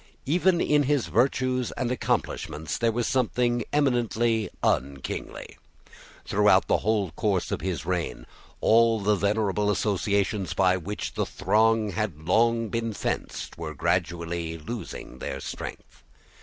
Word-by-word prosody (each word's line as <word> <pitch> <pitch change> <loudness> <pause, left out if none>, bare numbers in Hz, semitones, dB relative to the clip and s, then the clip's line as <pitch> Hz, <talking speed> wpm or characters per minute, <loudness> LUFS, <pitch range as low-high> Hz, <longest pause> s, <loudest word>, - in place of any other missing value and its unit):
Even 175 +4 +3
in 150 -3 +3
his 145 -2 +1
virtues 125 - +1
and 125 -2 -2
accomplishments 80 - -2
there 115 -1 +1
was 120 +1 -1
something 120 -1 +1
eminently 120 -5 +1
unkingly. 70 +1 -2 0.7
Throughout - - +4
the - - +2
whole 105 -4 0
course 95 +2 -1
of - - -2
his 85 -3 -3
reign, 85 -8 -2 0.4
all 115 0 +4
the 105 +1 +2
venerable 105 0 +1
associations 100 -1 0
by 95 -1 +4
which 95 +3 -4
the - - -1
throng 110 +2 +2
had 95 -7 -3
long 115 +3 +3
been 115 0 -2
fenced 100 - -4
were 80 -2 -5
gradually 85 -1 -1
losing 80 - -7
their - - -4
strength. - - -8
105 Hz, 130 wpm, -26 LUFS, 90-120 Hz, 0.7 s, Throughout